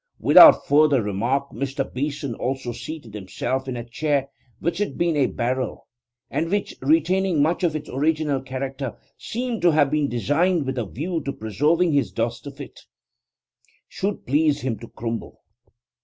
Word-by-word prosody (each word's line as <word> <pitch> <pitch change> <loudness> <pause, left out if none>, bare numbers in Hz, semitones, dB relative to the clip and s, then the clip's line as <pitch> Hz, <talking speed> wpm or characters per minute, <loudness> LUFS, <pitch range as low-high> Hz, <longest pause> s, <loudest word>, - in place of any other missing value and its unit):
Without - - +8
further 145 -1 +4
remark 120 +8 -1
Mr. 135 0 -2
Beeson 140 -1 -3
also 130 0 -3
seated 145 -4 -8
himself 125 +6 -3
in 125 -2 -3
a 120 - -4
chair 140 +3 -1 0.3
which 170 +6 -2
had 205 -10 -2
been 170 -2 +1
a 140 -3 +3
barrel, 130 +2 -3 0.4
and 165 - -1
which, 205 +2 -1
retaining 165 +4 +2
much 160 +6 +1
of 165 -3 +1
its 150 -1 -5
original 150 0 0
character, 135 0 -5 0.2
seemed 240 -1 -3
to 175 - +5
have 150 -3 +3
been 150 -2 +1
designed 150 +7 +1
with 130 -1 -2
a 115 - -3
view 165 +5 -3
to 140 - -3
preserving 150 - +1
his 140 -1 +1
dust 115 +4 -3
if 140 0 -10
it 140 - -9 1.1
should 200 +1 -4
please 150 +2 +2
him 125 -4 -2
to 115 - -10
crumble. 115 0 -6
140 Hz, 160 wpm, -23 LUFS, 130-160 Hz, 1.1 s, Without